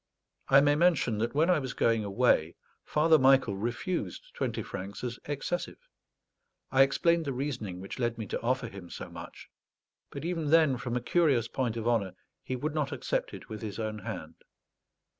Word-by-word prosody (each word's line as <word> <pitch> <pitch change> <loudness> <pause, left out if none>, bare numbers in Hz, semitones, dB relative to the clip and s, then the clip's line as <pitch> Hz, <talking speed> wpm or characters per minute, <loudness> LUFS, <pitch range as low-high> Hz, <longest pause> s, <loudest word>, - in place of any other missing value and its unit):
I 135 +1 +8
may 145 0 +4
mention 145 -9 +2
that 115 +4 -1
when 160 +5 +4
I 175 - +3
was 130 -3 -4
going 115 -2 +2
away 100 -6 +2 0.3
Father 155 +1 +4
Michael 130 -5 +4
refused 125 - -3
twenty 115 -3 -2
francs 100 +3 -7
as 120 -1 -4
excessive. 150 +5 -3 0.9
I 135 - +5
explained 165 +5 +3
the 140 - -2
reasoning 125 -9 -4
which 95 +5 -7
led 120 -1 0
me 110 - -4
to - - -4
offer 125 +1 0
him 95 -5 -10
so - - -8
much; - - -10 0.6
but - - -7
even 165 -4 -1
then, 155 -5 +5
from 120 0 -3
a - - -2
curious 135 -5 +2
point 120 -3 -2
of 115 0 -3
honour, 100 -6 +1 0.3
he 130 - -4
would 150 +5 -3
not 150 -3 -1
accept - - -2
it - - -11
with 110 -1 -7
his 105 -3 -5
own 110 -1 -3
hand. - - -7
125 Hz, 180 wpm, -29 LUFS, 110-150 Hz, 0.9 s, I